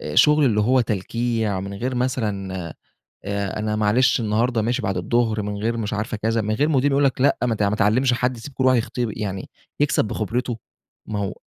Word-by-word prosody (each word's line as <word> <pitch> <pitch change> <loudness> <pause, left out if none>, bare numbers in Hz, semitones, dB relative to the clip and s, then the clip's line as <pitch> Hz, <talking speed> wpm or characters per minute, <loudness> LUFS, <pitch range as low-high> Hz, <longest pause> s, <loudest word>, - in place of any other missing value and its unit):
آآ، - - -5
شُغل 150 -1 +5
اللي 105 -4 +3
هو 125 +4 +3
تلكيع 110 -1 -1
من 100 +1 -6
غير 125 +5 -3
مثلًا 110 -7 -2 0.7
آآ، 100 0 -2
أنا 105 0 -1
معلش 110 +5 +3
النهارده 115 +2 +1
ماشي 120 +4 0
بعد 95 -1 -1
الضُّهر 110 +3 +1
من 105 0 -4
غير 115 +1 0
مش 110 -2 -3
عارفة 105 +2 -3
كذا، 115 +1 0
من 110 +1 -1
غير 150 +6 +1
مدير 140 -1 +2
يقول 140 +1 +2
لك 130 -1 0
لأ، 140 0 +4
ما 120 -2 +1
ت 105 - -1
ما 100 +1 +1
تعلّمش 120 +5 +3
حد، 125 +1 0
سيب 130 +5 -9
كل 130 - -1
واحد 130 -1 +5
يخت 115 - -3
يعني 105 -5 -3 0.3
يكسَب 145 -5 +2
بخِبرته، 115 +4 -2 0.5
ما 105 -1 -3
هو 100 0 -2
115 Hz, 210 wpm, -22 LUFS, 105-125 Hz, 0.7 s, شُغل